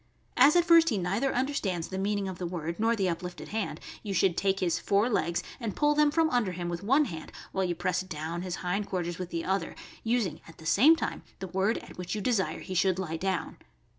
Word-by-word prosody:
As 300 Hz, -, +6 dB
at 345 Hz, -1 st, +5 dB
first 335 Hz, -1 st, +7 dB
he 220 Hz, -, 0 dB
neither 200 Hz, +9 st, 0 dB
understands 240 Hz, -, -1 dB
the 190 Hz, -, -4 dB
mean 205 Hz, +2 st, 0 dB
ing 200 Hz, -1 st, -2 dB
of 185 Hz, -2 st, -6 dB
the 180 Hz, -, -2 dB
word 170 Hz, 0 st, -4 dB
nor 225 Hz, +1 st, +3 dB
the 195 Hz, -4 st, 0 dB
uplifted 180 Hz, +1 st, -4 dB
hand, 220 Hz, -1 st, -3 dB, 0.2 s
you 200 Hz, -3 st, -4 dB
should 185 Hz, -3 st, +3 dB
take 195 Hz, +1 st, +1 dB
his 175 Hz, -2 st, +1 dB
fore 200 Hz, +3 st, +2 dB
legs 170 Hz, -7 st, 0 dB, 0.2 s
and 225 Hz, -5 st, -4 dB
pull 295 Hz, 0 st, +3 dB
them 300 Hz, 0 st, +4 dB
from 325 Hz, +2 st, +3 dB
under 220 Hz, -7 st, +1 dB
him 175 Hz, 0 st, -4 dB
with 170 Hz, 0 st, -4 dB
one 270 Hz, +9 st, +3 dB
hand 160 Hz, -, -7 dB, 0.2 s
while 190 Hz, 0 st, 0 dB
you 175 Hz, -1 st, -1 dB
press 180 Hz, +1 st, 0 dB
down 170 Hz, -1 st, -5 dB
his 180 Hz, -1 st, -3 dB
hind 200 Hz, +3 st, -1 dB
quarters 175 Hz, -2 st, -3 dB
with 180 Hz, -1 st, -4 dB
the 165 Hz, -1 st, -3 dB
other, 190 Hz, -3 st, -1 dB, 0.3 s
using 225 Hz, -9 st, 0 dB
at 165 Hz, -, -14 dB
the 160 Hz, -, -13 dB
same 270 Hz, -, +6 dB
time -, -, -3 dB, 0.2 s
the 190 Hz, -, -6 dB
word 195 Hz, +5 st, +1 dB
at -, -, -11 dB
which 180 Hz, +3 st, -3 dB
you -, -, -2 dB
desire 215 Hz, -3 st, 0 dB
he 185 Hz, -, -6 dB
should 185 Hz, 0 st, +2 dB
lie 170 Hz, -4 st, -3 dB
down. 190 Hz, +1 st, -2 dB
190 Hz, 240 wpm, -29 LUFS, 175-225 Hz, 0.3 s, first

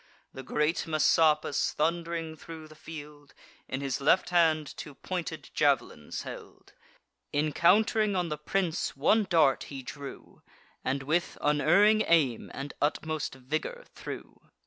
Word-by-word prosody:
The 135 Hz, -, -7 dB
great 150 Hz, +5 st, 0 dB
Messapus, 155 Hz, -1 st, +3 dB
thund'ring 165 Hz, 0 st, -1 dB
thro' 160 Hz, 0 st, -10 dB
the 155 Hz, -, -14 dB
field, 150 Hz, -2 st, -11 dB, 0.3 s
In 130 Hz, -, -4 dB
his 140 Hz, 0 st, -2 dB
left 165 Hz, +6 st, +3 dB
hand 160 Hz, -4 st, +2 dB
two 145 Hz, -, -8 dB
pointed 180 Hz, 0 st, -5 dB
jav'lins -, -, 0 dB
held: -, -, -10 dB, 0.6 s
Encount'ring 195 Hz, +8 st, +3 dB
on 175 Hz, -2 st, 0 dB
the 150 Hz, -, -3 dB
prince, 170 Hz, -2 st, -1 dB
one 210 Hz, +9 st, +3 dB
dart 155 Hz, -6 st, +3 dB
he 135 Hz, -2 st, -8 dB
drew, 140 Hz, +1 st, -9 dB, 0.4 s
And 135 Hz, +1 st, -1 dB
with 160 Hz, +5 st, 0 dB
unerring 195 Hz, +9 st, +4 dB
aim 145 Hz, -9 st, +2 dB
and 140 Hz, +1 st, -6 dB
utmost 155 Hz, 0 st, -1 dB
vigour 155 Hz, -, -4 dB
threw. -, -, -8 dB
155 Hz, 125 wpm, -29 LUFS, 145-170 Hz, 0.6 s, unerring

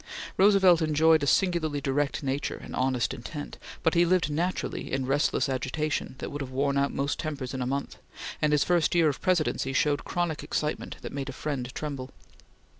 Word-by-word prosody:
Roosevelt 190 Hz, -3 st, +5 dB
enjoyed 160 Hz, 0 st, +4 dB
a 145 Hz, -, -1 dB
singularly 165 Hz, -4 st, +2 dB
direct 140 Hz, +1 st, -1 dB
nature 135 Hz, +1 st, -2 dB
and -, -, -8 dB
honest 130 Hz, -1 st, 0 dB
intent, 145 Hz, +5 st, -7 dB, 0.2 s
but 160 Hz, -, +3 dB
he 170 Hz, 0 st, +5 dB
lived 175 Hz, -3 st, +2 dB
naturally 175 Hz, +5 st, -2 dB
in 135 Hz, -1 st, -1 dB
restless 140 Hz, +3 st, +1 dB
agitation 135 Hz, +3 st, -2 dB
that -, -, -6 dB
would 145 Hz, -, -5 dB
have 135 Hz, -, -4 dB
worn 140 Hz, +2 st, 0 dB
out 140 Hz, 0 st, +2 dB
most 140 Hz, +1 st, -2 dB
tempers 145 Hz, -5 st, -4 dB
in 130 Hz, -, -3 dB
a 125 Hz, -, -1 dB
month, 140 Hz, +1 st, -3 dB, 0.4 s
and 150 Hz, -, +3 dB
his 150 Hz, -1 st, +4 dB
first 175 Hz, -1 st, +2 dB
year 165 Hz, -3 st, +5 dB
of 140 Hz, -, -4 dB
Presidency 160 Hz, -7 st, +1 dB
showed 145 Hz, +1 st, +1 dB
chronic 175 Hz, -3 st, -2 dB
excitement 150 Hz, 0 st, -3 dB
that -, -, -6 dB
made 140 Hz, 0 st, -4 dB
a -, -, -5 dB
friend 130 Hz, -3 st, -4 dB
tremble. 140 Hz, -4 st, -4 dB
145 Hz, 190 wpm, -28 LUFS, 135-160 Hz, 0.4 s, Roosevelt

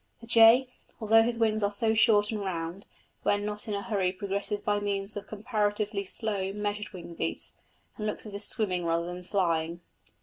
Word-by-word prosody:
The 230 Hz, -, -12 dB
jay, 230 Hz, +2 st, +6 dB, 0.3 s
although 225 Hz, 0 st, +5 dB
his 235 Hz, +1 st, 0 dB
wings 220 Hz, -1 st, +2 dB
are 205 Hz, -, +2 dB
so 220 Hz, +2 st, +1 dB
short 210 Hz, -1 st, +4 dB
and 215 Hz, -, -2 dB
round, 175 Hz, 0 st, -4 dB, 0.3 s
when 205 Hz, 0 st, +1 dB
not 210 Hz, +2 st, -5 dB
in 210 Hz, -, -2 dB
a 200 Hz, -, -3 dB
hurry 195 Hz, -5 st, 0 dB
progresses 200 Hz, +1 st, -3 dB
by 205 Hz, 0 st, 0 dB
means 200 Hz, 0 st, -2 dB
of 205 Hz, -, -6 dB
comparatively 210 Hz, -2 st, -1 dB
slow, 195 Hz, -1 st, -1 dB
measured 210 Hz, 0 st, -3 dB
wing 175 Hz, -3 st, -9 dB
beats, 80 Hz, -, -2 dB, 0.4 s
and 215 Hz, -, -3 dB
looks 210 Hz, -, -3 dB
as 210 Hz, -, -8 dB
if 200 Hz, -, -4 dB
swimming 195 Hz, -5 st, +1 dB
rather 170 Hz, 0 st, 0 dB
than 180 Hz, +1 st, -6 dB
flying. 170 Hz, -3 st, 0 dB
205 Hz, 190 wpm, -28 LUFS, 190-215 Hz, 0.4 s, jay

